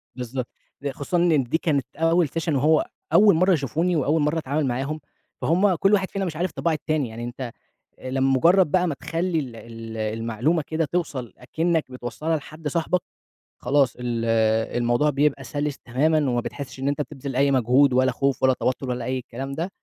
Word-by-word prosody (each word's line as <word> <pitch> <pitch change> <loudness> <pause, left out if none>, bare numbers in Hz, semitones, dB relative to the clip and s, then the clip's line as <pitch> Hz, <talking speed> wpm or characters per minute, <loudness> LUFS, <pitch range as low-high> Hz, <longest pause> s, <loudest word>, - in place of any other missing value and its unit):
بالضبط 125 0 -4 0.3
د 140 - -2
خصوصًا 140 +6 -2
إن 170 -5 +3
دي 125 +6 0
كانت 150 -5 0
أول 165 +1 +3
سيشن 165 -1 -1
وهو 155 +4 +3 0.3
أول 200 +2 +7
مرَّة 185 +3 +4
يشوفوني، 160 +4 0
وأول 150 +1 +2
مرَّة 150 +2 +1
أتعامل 150 0 -1
معاهم، 135 +5 -2 0.4
فهُم 185 +3 +3
كلّ 195 +5 +2
واحد 195 -2 +2
فينا 195 -1 -2
مش 165 -4 -4
عارف 175 +3 -1
طباع 170 - 0
التاني، 155 -4 -1
يعني 115 +1 -7
أنت 120 0 -5 0.5
لمجرّد 135 +7 +3
بقى 180 +3 +3
ما 155 - -1
تخلّي 165 +4 -2
ال 125 -6 -5
ال 115 0 -9
المعلومة 115 +8 0
كده 160 +1 0
توصَل 140 - -2
أكنَّك 160 +3 -1
بتوصّلها 125 +6 -3
لحد 155 +1 -7
صاحبك، 170 +4 0 0.6
خلاص 135 -1 +2
ال 120 -2 -2 0.5
الموضوع 120 +5 +2
بيبقى 140 -1 +1
سَلِس 145 +3 -3
تمامًا 145 +7 +1
وما 120 -1 +1
بتحسّش 130 +1 -7
إن 135 - -2
أنت 145 +1 0
بتبذِل 140 -2 -6
أي 140 +2 +3
مجهود 130 +2 +4
ولا 130 +1 +3
خوف 135 +2 -1
ولا 130 0 +5
توتُّر 130 +1 -2
ولا 125 -1 -3
أي 130 +1 -1
الكلام 130 +2 -6
ده، 165 +6 -3
140 Hz, 180 wpm, -24 LUFS, 125-160 Hz, 0.6 s, أول